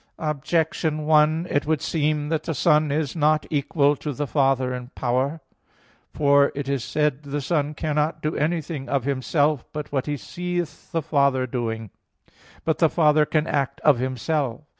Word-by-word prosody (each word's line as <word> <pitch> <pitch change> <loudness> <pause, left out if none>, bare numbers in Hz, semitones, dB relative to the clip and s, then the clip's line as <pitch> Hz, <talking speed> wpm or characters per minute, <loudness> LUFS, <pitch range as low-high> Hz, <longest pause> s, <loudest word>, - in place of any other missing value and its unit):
Objection 155 0 -1
1: 155 +2 +4
It 145 +1 0
would 155 -1 +1
seem 150 -1 -1
that 160 -2 0
the 165 0 -4
Son 150 +2 +3
is 150 0 -1
not 155 -1 +2
equal 145 0 +2
to 145 +1 -5
the 145 +3 -2
Father 135 -2 +1
in 125 -1 -6
power. 130 +5 -1 0.7
For 140 -1 +4
it 140 -1 -4
is 140 -3 -1
said 150 -2 0
(John - - -21
5:19): 140 - -10
"The 145 - -1
Son 150 0 0
cannot 155 +1 -1
do 155 - -1
anything 155 -2 -2
of 140 -3 0
Himself 145 +1 +1
but 150 -1 -6
what 135 -1 -1
He 145 -1 -1
seeth 175 +2 -5
the 165 -2 -1
Father 140 -3 +2
doing." 115 -4 -4 0.7
But 160 - 0
the 165 - +4
Father 150 -2 +3
can 155 -1 +1
act 140 -3 -1
of 145 -5 +4
Himself. 130 +1 -2
150 Hz, 175 wpm, -24 LUFS, 140-155 Hz, 0.7 s, 1